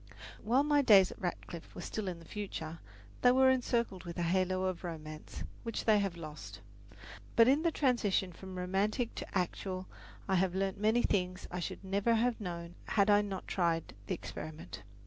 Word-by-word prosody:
While 250 Hz, +6 st, +3 dB
my 295 Hz, -1 st, +4 dB
days 200 Hz, -7 st, +7 dB
at -, -, -12 dB
Radcliffe 175 Hz, -2 st, -5 dB
were -, -, -6 dB
still 210 Hz, +2 st, -4 dB
in 180 Hz, -2 st, -3 dB
the 165 Hz, -, -14 dB
future, 165 Hz, -5 st, -5 dB, 0.4 s
they 245 Hz, -, +7 dB
were 260 Hz, +1 st, +6 dB
encircled 235 Hz, -6 st, 0 dB
with 170 Hz, -2 st, -7 dB
a 175 Hz, -, 0 dB
halo 185 Hz, +2 st, +1 dB
of 185 Hz, -1 st, -2 dB
romance, 155 Hz, -3 st, -7 dB, 0.2 s
which 230 Hz, -1 st, -4 dB
they 215 Hz, -2 st, +5 dB
have 195 Hz, -4 st, -1 dB
lost; 150 Hz, -, -8 dB, 0.8 s
but 230 Hz, -, +7 dB
in 280 Hz, +4 st, +5 dB
the 335 Hz, -, +3 dB
transition 230 Hz, -, +1 dB
from 190 Hz, +1 st, -9 dB
romantic 200 Hz, +6 st, 0 dB
to -, -, -4 dB
actual 185 Hz, +1 st, -2 dB, 0.4 s
I 190 Hz, -1 st, +3 dB
have 185 Hz, 0 st, +1 dB
learned 195 Hz, 0 st, 0 dB
many 220 Hz, +4 st, +3 dB
things 185 Hz, -2 st, 0 dB
I 180 Hz, -, -3 dB
should 175 Hz, -, -5 dB
never 200 Hz, +4 st, +2 dB
have 230 Hz, 0 st, +1 dB
known 170 Hz, -2 st, -5 dB
had 205 Hz, 0 st, +3 dB
I 205 Hz, 0 st, +6 dB
not 195 Hz, -2 st, -5 dB
tried 170 Hz, -3 st, 0 dB
the -, -, 0 dB
experiment. 100 Hz, +5 st, -8 dB
190 Hz, 185 wpm, -33 LUFS, 175-220 Hz, 0.8 s, days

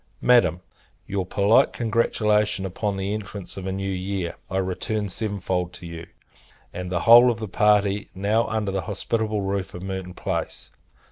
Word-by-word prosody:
Madam, 120 Hz, -8 st, +4 dB, 0.4 s
Your 95 Hz, -2 st, -3 dB
polite 100 Hz, +3 st, +3 dB
congratulation 105 Hz, -3 st, +1 dB
upon 100 Hz, +2 st, -2 dB
the 95 Hz, +1 st, -2 dB
entrance 100 Hz, -2 st, -6 dB
of 95 Hz, -1 st, -6 dB
a -, -, -1 dB
new 95 Hz, +1 st, -3 dB
year, 95 Hz, -1 st, -3 dB, 0.2 s
I 95 Hz, -, -2 dB
return 100 Hz, +3 st, -2 dB
seven 100 Hz, +1 st, -1 dB
fold 90 Hz, -1 st, -2 dB
to -, -, -10 dB
you, 85 Hz, 0 st, -8 dB, 0.7 s
and 90 Hz, 0 st, -5 dB
the 90 Hz, -2 st, 0 dB
whole 120 Hz, +4 st, +8 dB
of 120 Hz, -, 0 dB
the 110 Hz, -1 st, -5 dB
party 105 Hz, 0 st, +2 dB
now 105 Hz, +4 st, +1 dB
under 110 Hz, -3 st, -1 dB
the 95 Hz, 0 st, -1 dB
hospitable 110 Hz, -2 st, -1 dB
roof 95 Hz, -1 st, -3 dB
of 90 Hz, -, -7 dB
Merton 95 Hz, -1 st, -5 dB
Place. -, -, -4 dB
100 Hz, 165 wpm, -24 LUFS, 95-105 Hz, 0.7 s, whole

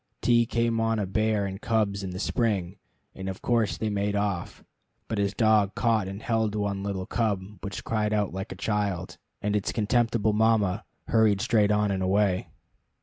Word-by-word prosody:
T 120 Hz, -1 st, +4 dB
came 115 Hz, -1 st, +1 dB
on 115 Hz, 0 st, +1 dB
a 105 Hz, -, 0 dB
bear 105 Hz, +1 st, +1 dB
and 95 Hz, +1 st, -5 dB
cubs 105 Hz, -3 st, 0 dB
in 95 Hz, -, -4 dB
the 90 Hz, -, -6 dB
spring, 100 Hz, -4 st, -1 dB, 0.4 s
and 95 Hz, 0 st, -5 dB
of 95 Hz, -, -7 dB
course 115 Hz, -4 st, +1 dB
they 110 Hz, -1 st, -2 dB
made 100 Hz, 0 st, -1 dB
off, 100 Hz, -4 st, -2 dB, 0.4 s
but 110 Hz, -, -2 dB
his 100 Hz, 0 st, 0 dB
dog 110 Hz, -3 st, +3 dB
caught 115 Hz, -5 st, +1 dB
and 100 Hz, +3 st, -7 dB
held 110 Hz, -3 st, 0 dB
one 100 Hz, -2 st, -1 dB
little 100 Hz, -2 st, -3 dB
cub 105 Hz, -4 st, -2 dB
which 100 Hz, -1 st, -5 dB
cried 105 Hz, -1 st, 0 dB
out 105 Hz, -3 st, 0 dB
like 95 Hz, +3 st, -5 dB
a -, -, -5 dB
child 100 Hz, -3 st, -2 dB, 0.2 s
and 105 Hz, 0 st, 0 dB
its 105 Hz, -, 0 dB
contemptible 115 Hz, -1 st, +1 dB
mama 105 Hz, -2 st, +2 dB, 0.2 s
hurried 110 Hz, -3 st, +4 dB
straight 105 Hz, -1 st, +3 dB
on 105 Hz, -1 st, +2 dB
and 95 Hz, -1 st, -1 dB
away. 95 Hz, 0 st, +1 dB
105 Hz, 185 wpm, -27 LUFS, 100-110 Hz, 0.4 s, T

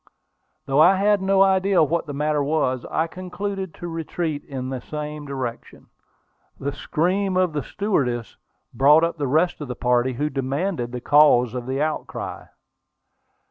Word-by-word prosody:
Though 135 Hz, +1 st, +1 dB
I 180 Hz, +4 st, +7 dB
had 205 Hz, +1 st, +2 dB
no 195 Hz, 0 st, +4 dB
idea 190 Hz, -2 st, +3 dB
what 165 Hz, +2 st, -1 dB
the 145 Hz, -, -5 dB
matter 150 Hz, 0 st, 0 dB
was, 140 Hz, -4 st, 0 dB
I 160 Hz, -, 0 dB
concluded 185 Hz, +2 st, -5 dB
to 175 Hz, -, -7 dB
retreat 165 Hz, -2 st, -3 dB
in 130 Hz, -2 st, -6 dB
the 130 Hz, -2 st, -4 dB
same 150 Hz, +1 st, -6 dB
direction. 130 Hz, -4 st, -6 dB, 0.7 s
The 140 Hz, +1 st, -2 dB
scream 185 Hz, +7 st, -1 dB
of 185 Hz, -3 st, +2 dB
the 150 Hz, -, -1 dB
stewardess 125 Hz, -, -2 dB, 0.4 s
brought 145 Hz, +6 st, +5 dB
up 165 Hz, -1 st, -1 dB
the 145 Hz, -, 0 dB
rest 160 Hz, +5 st, +1 dB
of 145 Hz, -, -5 dB
the 125 Hz, -, -5 dB
party, 125 Hz, +1 st, +1 dB
who 150 Hz, +5 st, -2 dB
demanded 135 Hz, 0 st, -2 dB
the 125 Hz, 0 st, -5 dB
cause 135 Hz, -4 st, +5 dB
of 125 Hz, -1 st, -5 dB
the 135 Hz, +3 st, 0 dB
outcry. 155 Hz, 0 st, -4 dB
150 Hz, 160 wpm, -23 LUFS, 135-180 Hz, 0.7 s, I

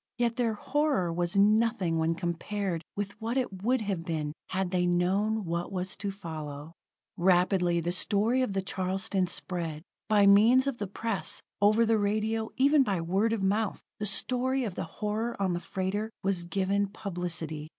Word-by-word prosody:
Yet 235 Hz, -1 st, +1 dB
their 230 Hz, -3 st, 0 dB
horror 270 Hz, -, 0 dB
was 175 Hz, +3 st, -1 dB
nothing 205 Hz, -4 st, +3 dB
when 160 Hz, +1 st, +1 dB
compared 175 Hz, +1 st, -3 dB
with 200 Hz, -1 st, -3 dB
what 230 Hz, +3 st, -1 dB
it 200 Hz, -8 st, -2 dB
would 250 Hz, +3 st, +1 dB
have 195 Hz, -5 st, -2 dB
been, 155 Hz, -3 st, -3 dB
had 190 Hz, -1 st, -2 dB
they 180 Hz, -1 st, +1 dB
known 195 Hz, +5 st, +1 dB
what 170 Hz, +2 st, -3 dB
was 185 Hz, -1 st, -2 dB
to 200 Hz, +1 st, -3 dB
follow. 155 Hz, -5 st, -7 dB, 0.4 s
Rapidly 180 Hz, -1 st, +3 dB
the 170 Hz, +1 st, -1 dB
story 215 Hz, +7 st, +1 dB
of 250 Hz, -6 st, 0 dB
the_ 195 Hz, -1 st, -1 dB
Charleston_ 190 Hz, 0 st, -1 dB
spread. 165 Hz, -4 st, -2 dB, 0.3 s
By 205 Hz, -2 st, +5 dB
means 220 Hz, +6 st, +6 dB
of 275 Hz, -3 st, -2 dB
the 205 Hz, -, -2 dB
press, 200 Hz, -4 st, -3 dB, 0.2 s
over 215 Hz, +3 st, +5 dB
the 225 Hz, -1 st, +3 dB
radio, 215 Hz, +2 st, 0 dB
even 280 Hz, +3 st, +5 dB
by 200 Hz, -8 st, +1 dB
word 190 Hz, +7 st, +1 dB
of 225 Hz, -4 st, -1 dB
mouth, 205 Hz, +2 st, 0 dB, 0.2 s
the 210 Hz, -, -1 dB
story 255 Hz, +5 st, 0 dB
of 210 Hz, -6 st, -3 dB
the -, -, -4 dB
horror 215 Hz, +7 st, -3 dB
on 190 Hz, -2 st, +1 dB
the 175 Hz, -, -1 dB
freighter 195 Hz, +4 st, -3 dB
was 190 Hz, -3 st, 0 dB
given 200 Hz, +2 st, 0 dB
publicity. 170 Hz, -6 st, -4 dB
195 Hz, 170 wpm, -29 LUFS, 175-220 Hz, 0.4 s, means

